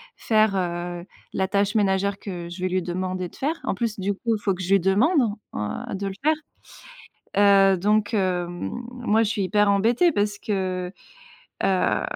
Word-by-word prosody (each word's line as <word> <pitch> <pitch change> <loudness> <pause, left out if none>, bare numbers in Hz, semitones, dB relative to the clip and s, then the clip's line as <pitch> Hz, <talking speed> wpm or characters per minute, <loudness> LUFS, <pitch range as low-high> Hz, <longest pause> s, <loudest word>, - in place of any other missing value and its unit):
faire, 215 -3 +2
heu, 175 -1 -3 0.3
la 190 - 0
tâche 200 +1 +1
ménagère 200 -1 +1
que 175 -4 -6
je 175 +1 -8
vais 185 - 0
lui 185 0 0
demander 185 +1 -3
de - - -17
faire. 310 +5 -2
En - - -1
plus 215 0 -2
du 200 +2 0
coup, 230 +3 -1
il 205 - -7
faut 195 - +1
que 185 +1 -6
je 185 - -3
lui 195 - +6
demande, 225 - +3 0.3
heu, 105 0 -4
de 195 +1 -3
le 195 - -4
faire. 310 +1 +4 1.0
Heu, 195 -2 +6
donc, 210 +3 +1
heu, 180 -4 +1
moi 235 +4 -2
je 210 - 0
suis 210 -3 -1
hyper 205 +1 +2
embêtée 230 - +3
parce 205 -5 0
que, 185 -3 -2 0.7
heu, 190 -1 +2
195 Hz, 185 wpm, -24 LUFS, 185-215 Hz, 1.0 s, lui